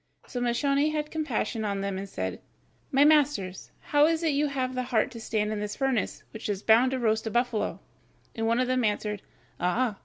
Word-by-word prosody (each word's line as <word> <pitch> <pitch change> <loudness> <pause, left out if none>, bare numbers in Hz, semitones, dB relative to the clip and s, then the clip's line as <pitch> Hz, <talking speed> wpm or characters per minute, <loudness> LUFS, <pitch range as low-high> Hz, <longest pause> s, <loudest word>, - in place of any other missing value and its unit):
So 245 - -5
Moscione 275 +5 +2
had 300 -1 -3
compassion 250 -7 -2
on 200 -2 -1
them 195 -1 -2
and 195 0 -6
said, 95 - -4 0.5
"My 275 +2 +5
masters, 290 -12 +2
how 290 +1 +4
is 330 0 0
it 325 - +3
you 295 +2 +2
have 260 -2 -2
the 255 - -1
heart 230 +3 +2
to 235 - -8
stand 215 -1 -1
in 210 - -3
this 210 0 -4
furnace, 265 -5 -1
which 220 -1 -6
is 200 0 -2
bound 230 +4 +5
to 260 - -1
roast 220 -2 +1
a - - 0
buffalo?" 240 -1 0 0.5
And 225 0 -2
one 230 +2 +2
of 255 - +3
them 255 0 +1
answered: 210 -1 -1 0.4
"Ah! 210 +4 0
240 Hz, 210 wpm, -27 LUFS, 210-275 Hz, 0.5 s, My